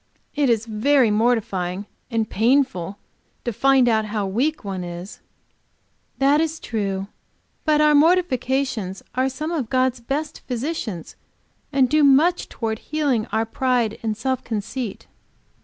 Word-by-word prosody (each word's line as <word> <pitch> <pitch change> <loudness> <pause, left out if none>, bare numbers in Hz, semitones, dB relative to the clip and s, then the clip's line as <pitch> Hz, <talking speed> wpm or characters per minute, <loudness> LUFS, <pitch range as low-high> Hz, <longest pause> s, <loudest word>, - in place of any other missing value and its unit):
"It 290 -3 +2
is 230 -1 +2
very 230 +2 +3
mortifying 210 -4 0 0.2
and 225 -3 0
painful 220 -6 +1 0.5
to 240 - -1
find 270 +2 +4
how 215 -2 +1
weak 255 +11 -1
one 190 -3 -4
is." 175 +2 -8 1.0
"That 280 +3 +4
is 320 0 -2
true. 195 -4 -2 0.6
But 305 -1 +3
our 300 0 +5
mortifications 270 - +1
are 260 +1 +1
some 305 +5 -4
of 285 -10 -2
God's 255 -1 +1
best 290 +6 -4
physicians, 245 - -4 0.6
and 270 -2 +3
do 305 +3 +3
much 295 +6 +4
toward 220 -1 -3
healing 280 -7 -1
our 225 0 0
pride 240 -2 0
and 220 -2 -2
self 260 +2 -1
conceit." 225 +1 -4
245 Hz, 130 wpm, -22 LUFS, 215-280 Hz, 1.0 s, our